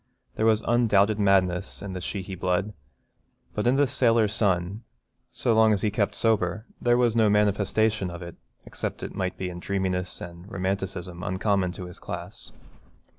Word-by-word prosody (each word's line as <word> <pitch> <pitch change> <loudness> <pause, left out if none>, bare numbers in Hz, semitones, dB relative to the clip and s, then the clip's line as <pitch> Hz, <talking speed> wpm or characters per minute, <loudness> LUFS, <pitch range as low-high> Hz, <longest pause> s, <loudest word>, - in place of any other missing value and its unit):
There 110 - +1
was 110 0 +3
undoubted 110 -3 +3
madness 95 -2 +2
in 100 -2 -5
the 90 - -5
Sheehy 95 +1 -5
blood, 95 +3 -1 0.8
but 105 +3 -1
in 125 - +4
this 140 -3 +2
sailor 115 -3 +4
son, 100 -1 0 0.5
so 115 - +1
long 110 -1 +5
as 100 - -1
he 105 - +2
kept 100 -1 0
sober, 105 -2 +1 0.2
there 120 0 +3
was 120 -2 +2
no 110 -2 +4
manifestation 105 0 +2
of 85 0 -7
it 85 -1 -9 0.3
except - - -5
it - - -5
might 95 0 -3
be 90 -1 -3
in 85 - -8
a - - -13
dreaminess 95 -2 -2
and 85 +4 -10
romanticism 95 -2 -3
uncommon 95 +1 0
to 90 - -7
his 90 - -10
class. - - -7
100 Hz, 175 wpm, -26 LUFS, 90-110 Hz, 0.8 s, long